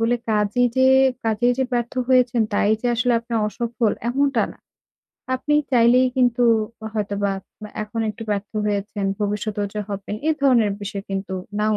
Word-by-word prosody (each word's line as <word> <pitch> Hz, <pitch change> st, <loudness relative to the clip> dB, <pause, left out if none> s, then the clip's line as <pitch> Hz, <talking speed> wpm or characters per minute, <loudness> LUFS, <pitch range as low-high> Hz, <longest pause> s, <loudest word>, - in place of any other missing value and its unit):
বলে, 230 Hz, +2 st, +2 dB
কাজেই 210 Hz, +4 st, +2 dB
যে 260 Hz, -, +4 dB, 0.4 s
কাজেই 230 Hz, +3 st, +2 dB
যে 265 Hz, -, +2 dB
ব্যর্থ 240 Hz, -1 st, -1 dB, 0.2 s
হয়েছেন, 250 Hz, -2 st, +3 dB
তাই 205 Hz, -, +2 dB
যে 245 Hz, -, -2 dB
আসলে 245 Hz, +1 st, +1 dB
আপনি 235 Hz, +1 st, -11 dB
অসফল, 235 Hz, 0 st, -1 dB, 0.2 s
এমনটা 275 Hz, -1 st, +1 dB
না। -, -, -21 dB, 0.8 s
আপনি 295 Hz, +3 st, 0 dB, 0.2 s
চাইলেই 245 Hz, +2 st, +5 dB
কিন্তু 245 Hz, -1 st, +2 dB, 0.5 s
হয়তোবা 205 Hz, -1 st, -1 dB, 0.4 s
আ -, -, -11 dB
এখন 215 Hz, +2 st, -5 dB
একটু 220 Hz, +2 st, -9 dB
ব্যর্থ 205 Hz, 0 st, -2 dB, 0.2 s
হয়েছেন। 205 Hz, 0 st, -2 dB, 0.2 s
ভবিষ্যতেও 205 Hz, 0 st, -2 dB
যে 210 Hz, -, -2 dB
হবেন, 200 Hz, 0 st, -5 dB
এ -, -, +5 dB
ধরনের 235 Hz, -6 st, +4 dB
বিষয় 200 Hz, 0 st, -5 dB
কিন্তু 195 Hz, -1 st, -3 dB, 0.2 s
নাও 215 Hz, 0 st, +2 dB
225 Hz, 160 wpm, -22 LUFS, 205-245 Hz, 0.8 s, চাইলেই